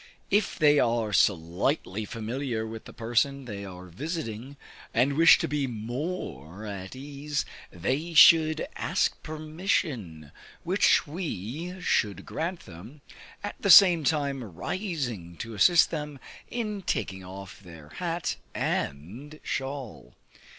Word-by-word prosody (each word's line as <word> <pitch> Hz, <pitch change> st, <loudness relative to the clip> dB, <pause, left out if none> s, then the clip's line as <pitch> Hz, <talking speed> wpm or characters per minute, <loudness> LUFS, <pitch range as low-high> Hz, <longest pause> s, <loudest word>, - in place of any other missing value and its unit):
If 205 Hz, 0 st, +2 dB
they 150 Hz, -2 st, +5 dB
are 115 Hz, -3 st, +1 dB
slightly 95 Hz, -, +1 dB
familiar 115 Hz, +1 st, -3 dB
with 110 Hz, 0 st, -8 dB
the -, -, -10 dB
person 125 Hz, +4 st, 0 dB
they 100 Hz, -4 st, -6 dB
are 90 Hz, -1 st, -9 dB
visiting, 135 Hz, -, -5 dB, 0.4 s
and 125 Hz, +5 st, +3 dB
wish 165 Hz, +3 st, +7 dB
to -, -, -2 dB
be 145 Hz, -1 st, -1 dB
more 110 Hz, -, -5 dB
at 100 Hz, +1 st, -7 dB
ease, 140 Hz, +2 st, -4 dB, 0.2 s
they 145 Hz, -, -2 dB
should 155 Hz, -, +7 dB
ask -, -, 0 dB
permission, 155 Hz, -, -3 dB, 0.3 s
which -, -, +3 dB
we 160 Hz, -, -5 dB
should 105 Hz, -, 0 dB
grant 170 Hz, +3 st, -3 dB
them, 105 Hz, -, -12 dB, 0.4 s
at 205 Hz, -, -6 dB
the 200 Hz, -, 0 dB
same 175 Hz, -3 st, +9 dB
time 140 Hz, -3 st, 0 dB
rising 120 Hz, -, -4 dB
to 115 Hz, 0 st, -6 dB
assist 170 Hz, -, +5 dB
them 150 Hz, -3 st, -4 dB, 0.3 s
in 215 Hz, -4 st, -3 dB
taking 95 Hz, -, -2 dB
off 95 Hz, 0 st, -10 dB
their 85 Hz, -6 st, -13 dB
hat 170 Hz, -, -3 dB, 0.2 s
and 110 Hz, -, -3 dB
shawl. 135 Hz, -, -5 dB
130 Hz, 120 wpm, -27 LUFS, 100-155 Hz, 0.4 s, same